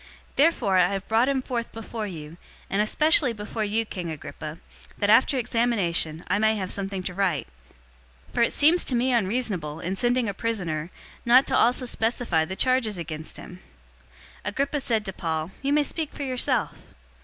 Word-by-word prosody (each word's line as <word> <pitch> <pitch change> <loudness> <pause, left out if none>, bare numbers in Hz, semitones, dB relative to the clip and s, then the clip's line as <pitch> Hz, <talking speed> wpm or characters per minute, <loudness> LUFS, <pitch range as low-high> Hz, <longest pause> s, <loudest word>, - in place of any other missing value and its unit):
Therefore 270 - +3
I 175 - +5
have 195 0 -4
brought 230 +4 +3
him 270 -2 0
forth 235 -3 -3
before 225 -1 -5
you, 160 -3 -8 0.3
and 200 - +2
especially 285 +3 +4
before 215 +1 -4
you, 215 +2 0
King 180 -5 -5
Agrippa, 155 0 -7 0.4
that, 205 0 +2
after 260 +4 +5
examination, 210 -10 0
I 205 - +1
may 220 0 +3
have 190 -3 -3
something 195 -1 -3
to 180 - -4
write. 180 -9 0 0.8
025:027 - - -21
For - - +1
it 235 - +3
seems 320 +4 +4
to 255 - +2
me 250 +2 +2
unreasonable, 195 -8 -1
in 185 +4 -3
sending 245 +2 +1
a 200 - -2
prisoner, 175 -8 -2 0.3
not 250 +3 +6
to - - +1
also 250 +2 +3
specify 225 -8 +1
the 190 - -5
charges 255 -4 +2
against 160 -2 -5
him." 180 - -11 0.8
026:001 - - -2
Agrippa 280 +1 -1
said 225 -5 0
to 195 - -3
Paul, 160 -1 -3
"You 275 0 -1
may 295 0 +4
speak 310 +1 -4
for 285 - -6
yourself." 255 -2 0
215 Hz, 180 wpm, -25 LUFS, 180-250 Hz, 0.8 s, not